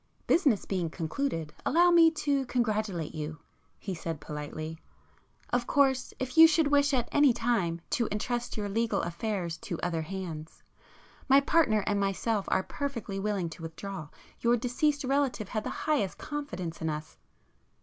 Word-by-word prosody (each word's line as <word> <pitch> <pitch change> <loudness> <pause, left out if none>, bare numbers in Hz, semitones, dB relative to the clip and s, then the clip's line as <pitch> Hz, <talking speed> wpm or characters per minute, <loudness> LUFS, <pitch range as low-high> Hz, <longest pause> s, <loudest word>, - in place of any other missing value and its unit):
"Business 285 - +3
being 180 -4 -1
concluded, 165 - -3
allow 350 +2 +4
me 335 -1 +7
to 290 -3 0
congratulate 215 -9 -1
you," 155 0 -5 0.4
he 195 - -5
said 165 -2 -4
politely—"Of 155 +10 -7
course, 265 -2 +2
if 260 +5 -1
you 325 - +12
should 320 0 +3
wish 285 0 +4
at 245 -3 +1
any 290 -3 +5
time 225 -8 0
to 235 -3 +1
entrust 240 +4 -2
your 205 -1 -2
legal 220 0 0
affairs 175 -1 -3
to 170 +1 -5
other 165 -2 -1
hands, 165 -3 -7 0.7
my 270 +1 +8
partner 280 -8 +3
and 205 -1 +1
myself 200 +1 0
are 190 - +2
perfectly 230 -9 -4
willing 200 -3 -1
to 170 - -10
withdraw. 165 +1 -6 0.3
Your 240 +1 +3
deceased 285 +5 0
relative 265 -6 0
had 215 -2 -2
the - - -3 0.2
highest 225 -12 +1
confidence 185 - -5
in 160 - 0
us...." 155 0 -6
215 Hz, 150 wpm, -29 LUFS, 170-270 Hz, 0.7 s, you